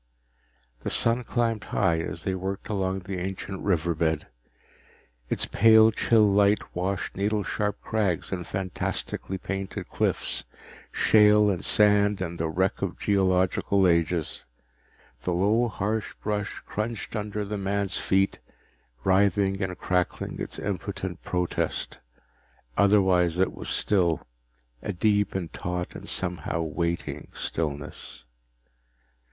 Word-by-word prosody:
The - - -3
sun 115 +2 +3
climbed 115 -3 -1
high 85 -4 +1
as 85 +1 -4
they 95 - -1
worked 95 +1 -4
along 95 -2 -1
the 90 0 -5
ancient 95 +1 -5
river 85 -4 +1
bed. 80 -1 0 1.0
Its - - +1
pale 110 0 +6
chill 110 0 +4
light 100 +1 +2
washed 95 +2 -2
needle 105 +2 0
sharp 105 0 -2
crags 105 -6 -1
and 90 -2 -4
fantastically 95 0 -3
painted 95 +1 -5
cliffs, - - 0 0.5
shale 105 -1 +5
and 90 -2 -3
sand 105 -1 +4
and 85 -2 -4
the 80 0 0
wreck 95 +4 0
of - - -2
geological 95 0 +2
ages. 85 -1 0 0.8
The 90 - 0
low 105 +7 +3
harsh 105 +1 -2
brush 105 -1 -3
crunched 110 +2 -4
under 105 0 -3
the 105 0 -4
man's 100 0 0
feet, 95 +1 +1 0.6
writhing 95 0 +2
and 90 -1 -2
crackling 90 -1 -1
its - - -5
impotent 95 -2 -4
protest. 90 -1 -2 0.8
Otherwise 95 -4 +4
it 95 0 +2
was - - -7
still, 90 -6 +1 0.6
a - - -3
deep 105 +2 +1
and 90 -4 -3
taut 90 0 -4
and - - -9
somehow 85 -2 -2
waiting 80 -2 -3
stillness. 75 -5 -4
95 Hz, 125 wpm, -26 LUFS, 90-105 Hz, 1.0 s, pale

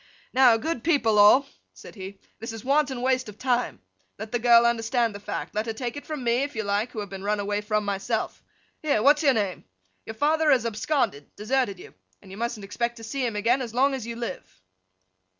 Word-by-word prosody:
'Now, 250 -3 +6
good 245 +1 -3
people 230 -10 +2
all,' 210 +7 +7 0.3
said - - -12
he, 195 -1 -9 0.2
'this 225 +1 -6
is 225 0 -9
wanton 275 -3 +1
waste 255 -2 +1
of 205 - -12
time. 250 -1 -1 0.4
Let 220 +1 -7
the 240 - 0
girl 235 0 +6
understand 235 0 +1
the 200 - -8
fact. 205 - -5
Let 215 +2 -2
her 225 - -2
take 240 +1 -4
it 290 - -9
from 305 -4 -5
me, 235 0 +2
if 285 -1 -3
you 220 - -2
like, 205 +4 -1
who 220 - -5
have 205 - -7
been 195 0 -7
run 210 +1 0
away 205 0 -1
from, 210 0 -1
myself. 200 +3 -2 0.4
Here, 285 -9 +1
what's 290 +2 +5
your 275 -4 +4
name! 200 -4 -2 0.4
Your 220 - -6
father 310 +5 +2
has 255 -5 +4
absconded—deserted 225 - -1
you—and 95 - -17
you 195 - -9
mustn't 235 -2 -3
expect 235 +4 -3
to 225 - -11
see 260 +4 -3
him 235 -3 -1
again 235 +6 +2
as 235 -2 -6
long 270 +2 +3
as 255 -4 -5
you 235 - -5
live. 235 - -7
230 Hz, 215 wpm, -25 LUFS, 210-260 Hz, 0.4 s, all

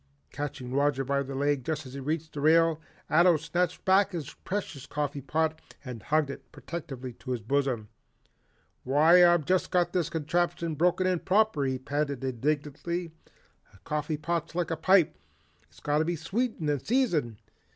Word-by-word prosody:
Catching 135 -3 -5
Roger 140 -1 +2
by 140 +1 0
the 135 0 -5
leg 140 -1 +1
just 155 +2 -3
as 130 - -10
he 140 - -6
reached 155 +3 -3
the 145 - -5
rail, 165 +1 +4 0.3
Ato 170 +1 +5
snatched 170 +3 -2
back 195 +1 +4
his 160 -6 -5
precious 170 -8 -5
coffee 145 -1 -3
pot 155 +3 -1 0.2
and 125 -4 -7
hugged 150 +6 +1
it - - -11
protectively 135 -7 -7
to 130 - -12
his 125 -2 -1
bosom. 130 -3 0 1.0
"Why 155 +7 +6
I've 175 -3 +5
just 185 +3 +1
got 180 -1 +1
this 175 -4 0
contraption 170 +1 -1
broken 180 +4 +2
in 185 -2 +1
proper," 195 -7 +2
he 130 -1 0
panted 140 0 -2
indignantly. 150 +6 -2 0.6
"A - - -16
coffee 150 0 -2
pot's 165 +1 -3
like 175 -2 -1
a - - +1
pipe, 180 +1 +3 0.5
it's 75 - -19
got 150 +1 0
to 160 - +1
be 175 +1 -1
sweetened 200 +1 -2
and 145 -3 0
seasoned. 175 - +1
155 Hz, 170 wpm, -28 LUFS, 140-170 Hz, 1.0 s, Why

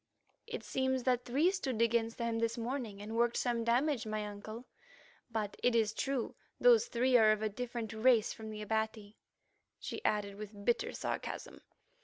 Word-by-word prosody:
"It - - -5
seems 260 -1 0
that 250 -1 +1
three 290 +9 +3
stood 270 - -2
against 230 0 +2
them 235 -1 -1
this 230 +1 0
morning, 230 -4 -4
and 220 +2 -5
worked 235 0 +2
some 240 -2 0
damage, 240 +1 +1
my 215 -1 -2
uncle, 215 +3 -8 0.6
but 215 -3 -3
it 245 -1 +3
is 220 -2 +3
true 265 +1 -2 0.3
those 240 -2 +6
three 250 +2 +2
are 220 -2 +6
of 215 0 0
a 215 - +1
different 235 0 -4
race 225 0 +4
from 220 -1 -8
the 215 0 -6
Abati," 220 -1 -2 0.6
she 435 - -6
added 200 -1 0
with 205 -1 -9
bitter 240 - +1
sarcasm. - - -5
230 Hz, 170 wpm, -34 LUFS, 215-245 Hz, 0.6 s, those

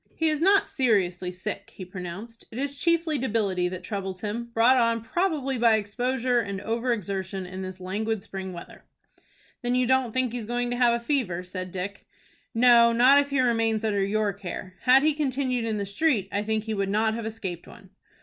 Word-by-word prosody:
"He 320 -1 +1
is 305 0 -1
not 390 +3 +4
seriously 190 - +1
sick," 200 +2 -6
he 185 - -7
pronounced. 185 +5 -8
"It 225 - -10
is 280 +1 -2
chiefly 330 -1 +1
debility 205 -7 0
that 180 0 -6
troubles 190 -2 -5
him, 220 +3 -3
brought 235 +3 +5
on 230 -2 +2
probably 275 -2 -1
by 230 -1 +5
exposure, 245 +4 0
and 200 -4 -3
over 230 +4 -1
exertion 195 -3 -3
in 185 +1 -7
this 185 0 -7
languid 205 +3 -2
spring 190 -3 -6
weather." 170 -1 -11 0.8
"Then 245 0 0
you 250 0 +2
don't 260 -1 +2
think 255 0 0
he 245 - -2
is 215 - -7
going 245 +1 -1
to - - 0
have 240 -1 +4
a 235 0 -6
fever?" 220 - -1
said 185 0 -6
Dick. 190 +2 -6 0.5
"No, 235 0 +6
not 255 +4 +6
if 285 0 0
he 280 -2 +1
remains 225 -3 +1
under 205 -3 +1
your 205 +1 0
care. 185 -1 -7
Had 265 +2 +6
he 310 0 +3
continued 260 -4 -1
in 220 -2 -1
the 200 - -2
street, 210 - +1
I 200 - 0
think 215 0 -1
he 220 -1 -3
would 195 -2 -1
not 220 +2 +1
have 225 0 -4
escaped 200 -6 -6
one." - - -15
225 Hz, 205 wpm, -26 LUFS, 195-250 Hz, 0.8 s, No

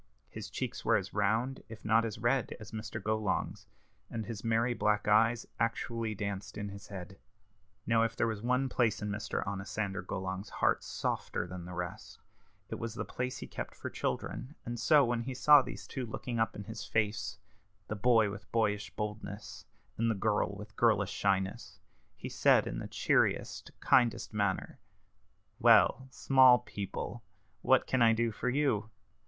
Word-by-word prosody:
His - - -7
cheeks - - -4
were - - +4
as - - -5
round, 110 +6 0
if 110 -1 -11
not 115 +1 +4
as 110 -2 -4
red, 125 +1 0
as 110 -1 -10
Mr. 110 0 -5
Golong's, 105 -1 -2 0.4
and 110 -2 -4
his 115 -3 -6
merry 115 +1 +2
black 105 -3 +1
eyes 115 +2 +4
actually 115 0 -1
danced 100 0 -4
in 105 -1 -4
his 100 +1 -10
head. 95 0 -9 0.7
Now 115 -1 +3
if 115 0 0
there - - +1
was 110 -3 -2
one 125 +3 +1
place 120 -5 +1
in 105 - -2
Mr. 105 +1 -3
Onosander 100 0 -3
Golong's 95 +1 -4
heart - - +1
softer - - -2
than 90 0 -8
the 90 0 -7
rest, 90 -1 -6 0.5
it - - -6
was 115 -1 -4
the - - -3
place 125 0 -3
he - - -6
kept - - -6
for - - -6
children; 140 +5 -3
and 120 0 -4
so 145 +3 +5
when 120 -1 0
he 130 +2 -5
saw 145 +2 +7
these 125 0 -8
two 130 -3 -5
looking 115 +2 -4
up 115 - +1
in 105 - -6
his 110 0 -7
face 105 -1 -1 0.5
the 105 - -3
boy 110 -1 +4
with 100 +1 -10
boyish 105 -1 +1
boldness, 105 -1 -6 0.3
and 115 0 +2
the 110 - +1
girl 105 0 0
with 105 0 -10
girlish 105 -4 +3
shyness 100 +1 -1 0.4
he - - -7
said, - - +4
in - - -4
the - - -5
cheeriest, - - +1
kindest 120 -3 +3
manner, 100 -3 -1 0.8
"Well, 130 - +5
small 130 -1 +6
people, 105 +2 -6 0.4
what 130 -1 +4
can 130 - +1
I 115 -1 +6
do 115 0 +1
for 125 - -2
you?" 125 -6 +1
110 Hz, 170 wpm, -32 LUFS, 100-120 Hz, 0.8 s, saw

